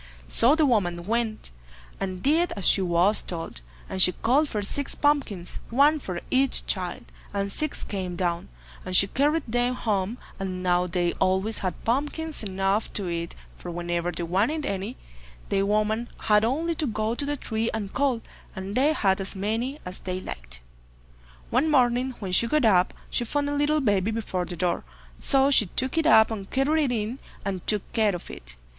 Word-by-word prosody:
So 250 - +5
the 315 -1 +3
woman 175 -9 +1
went, 225 - -1 0.5
and 185 -2 -4
did 330 +5 +2
as 200 - +1
she 195 - +5
was 180 +3 +2
told, 165 - -5 0.3
and 190 - 0
she 180 - +7
called 280 +6 +2
for 210 -2 -2
six 280 +7 +1
pumpkins, 275 -12 0
one 285 +6 +4
for 180 -9 -5
each 265 0 +3
child, 180 -3 -1 0.3
and 200 0 -1
six 305 +7 -2
came 185 -3 -4
down, 170 -1 -2 0.3
and 185 0 -2
she - - +8
carried 290 +9 +1
them 245 +2 0
home; 210 -1 -1 0.2
and 185 -1 -4
now 180 0 +2
they 175 0 0
always 190 +3 +2
had 185 -3 -4
pumpkins 295 +6 -1
enough 195 +1 -1
to 195 -4 -2
eat, 170 0 -4 0.2
for 180 - -7
whenever 175 0 -2
they 170 0 -4
wanted 215 - 0
any, 200 +5 -3 0.5
the 195 - +1
woman 215 +3 0
had 210 -1 +3
only 310 +9 0
to 310 -2 -1
go 215 0 -1
to 240 - -2
the 290 +1 -2
tree 225 -2 -2
and 205 -3 -4
call, 260 -4 +1 0.3
and 190 +1 -5
they 280 +7 +3
had 195 -7 +1
as 195 - -4
many 225 +8 -2
as 180 +1 -6
they 185 0 -4
liked. - - -8 0.9
One 270 +6 +2
morning 255 -2 +2
when 195 -3 -5
she 230 +6 +5
got 300 +1 +2
up, 185 -4 +3 0.2
she - - 0
found 285 +4 -1
a - - -1
little 295 +1 +2
baby 205 -5 +1
before 210 -5 -2
the 175 - -6
door, 180 0 0 0.4
so 275 0 +3
she 220 -7 +5
took 260 - -1
it 325 -1 +2
up 220 -7 +6
and 200 -3 -5
carried 295 +3 +2
it 255 - -1
in, 230 +2 -2 0.3
and 190 -3 -4
took 210 -3 +3
care 215 -4 +2
of 175 - -8
it. - - -8
215 Hz, 190 wpm, -25 LUFS, 185-265 Hz, 0.9 s, she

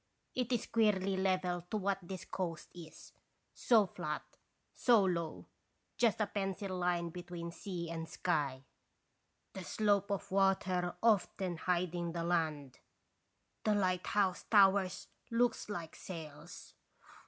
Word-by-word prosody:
It 250 -1 -1
is 240 -2 +1
queerly 200 -4 +2
level 185 -2 +1
to 215 - -1
what 200 -1 0
this 185 +1 -7
coast 170 -4 -4
is, 165 -3 -12 0.4
so 225 -4 +4
flat, 165 -5 -4 0.5
so 235 -5 +5
low, 170 -3 -2 0.5
just 230 -3 +2
a 215 - +3
pencil 195 -1 -3
line 175 -1 0
between 175 -1 -6
sea 175 -1 -5
and 165 -1 -5
sky, 140 -7 -1 0.9
the 190 - -6
slope 200 +3 +1
of 200 -1 -2
the - - -8
water 185 -2 +2
often 195 -5 +2
hiding 175 -1 -1
the 170 -1 -2
land, 155 -6 -1 0.8
the 215 -1 +3
lighthouse 185 0 +1
towers 195 -3 +4 0.2
looks 235 -1 +1
like 170 -6 -5
sails. 160 -2 -9
185 Hz, 125 wpm, -34 LUFS, 170-200 Hz, 0.9 s, so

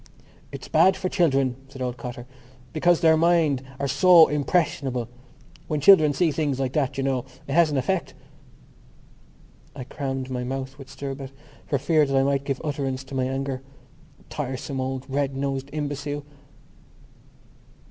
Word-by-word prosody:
"It's - - -8
bad 190 0 +4
for 185 - -2
children," 135 -9 +1
said 135 0 -12
old 125 -1 -2
Cotter, 125 -1 -7 0.5
"because 170 +2 +3
their 160 -2 +6
minds 160 -4 +3 0.2
are 140 - -1
so 165 +4 +6
impressionable. 140 -5 0 0.6
When 150 - -1
children 155 -1 +7
see 160 +3 +1
things 145 -3 -1
like 130 -1 -1
that, 140 -2 0
you 135 - -1
know, 135 -2 0 0.2
it - - -5
has 170 0 +5
an 145 - -1
effect...." 170 +8 -1 1.6
I 130 - -6
crammed 135 -1 -4
my 125 -1 -2
mouth 135 +2 -5
with 135 -1 -11
stirabout 135 -1 -6 0.4
for 140 - +1
fear 155 +4 +2
I 135 -1 +3
might 140 0 0
give 135 -2 -2
utterance 135 -3 -3
to 135 - -13
my 130 -1 +1
anger. 135 0 -3 0.7
Tiresome 135 -1 -4
old 130 0 -3
red 135 0 -1
nosed 135 0 -3
imbecile! 145 -1 -4
140 Hz, 150 wpm, -24 LUFS, 135-150 Hz, 1.6 s, children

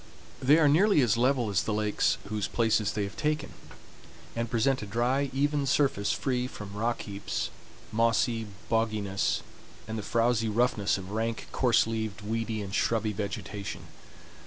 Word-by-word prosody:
They 140 +4 +6
are 160 -2 +5
nearly 180 +5 +5
as 115 -4 +3
level 125 -2 +2
as 90 -4 +2
the 110 - -2
lakes 105 -1 +1
whose 105 -1 -2
places 110 -3 +1
they 105 - -1
have 100 - -5
taken, 150 0 -1 0.8
and 115 0 -2
present 125 +3 +1
a 105 - -6
dry, 125 +6 +1
even 145 +1 +1
surface 135 -7 +2
free 125 -2 -1
from 105 -5 -9
rock 115 +3 -1
heaps, 100 -1 -4 0.4
mossy 115 0 +1 0.2
bogginess, 110 -4 0 0.5
and 110 0 -3
the - - -3
frowsy 115 +1 +1
roughness 105 -3 +1
of 95 0 -8
rank, 115 +1 -2
coarse 125 -3 +3
leaved, 110 -2 -3
weedy, 110 0 -2
and 100 -1 -7
shrubby 110 -1 +1
vegetation. 100 0 -5
115 Hz, 155 wpm, -29 LUFS, 105-125 Hz, 0.8 s, They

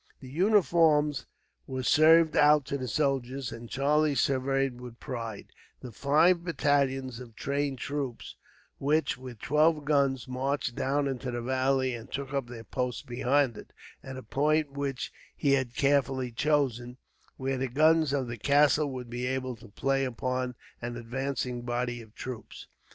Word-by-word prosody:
The 130 -1 -11
uniforms 160 -6 +3 0.4
were 130 -1 -4
served 160 +3 +5
out 150 -1 +5
to 140 - -2
the 130 - -4
soldiers, 135 -1 -1
and 115 0 -9
Charlie 145 +2 +2
surveyed, 135 -1 0
with 125 -1 -10
pride, 115 -5 -6 0.3
the 125 - -8
five 160 - +3
battalions 135 -6 0
of 120 -3 -11
trained 140 +3 -2
troops 140 -2 -4 0.4
which, 155 +3 +1
with 125 -2 -10
twelve 150 +4 +2
guns, 140 -3 +1
marched 130 0 -2
down 140 +3 0
into 130 -1 -3
the 120 -1 -3
valley 130 0 +1
and 120 +1 -8
took 140 0 -4
up 135 -3 -1
their 120 -2 -9
post 125 0 -3
beyond 125 +1 +1
it, - - -13 0.3
at 130 -1 -8
a 130 - -8
point 150 +5 +1
which 140 -2 -4 0.2
he 140 - +1
had 130 -3 +1
carefully 135 -3 +1
chosen, 125 -2 0 0.4
where 135 0 -2
the 135 - 0
guns 155 +3 +4
of 135 -3 0
the 120 0 -5
castle 145 +3 +4
would 125 -2 -6
be 120 +1 -3
able 130 -1 -2
to 115 - -14
play 135 +6 0
upon 125 0 -2 0.3
an 120 0 -4
advancing 125 +1 -3
body 120 0 -2
of 110 -1 -16
troops. 125 -3 -8
135 Hz, 155 wpm, -29 LUFS, 125-145 Hz, 0.4 s, served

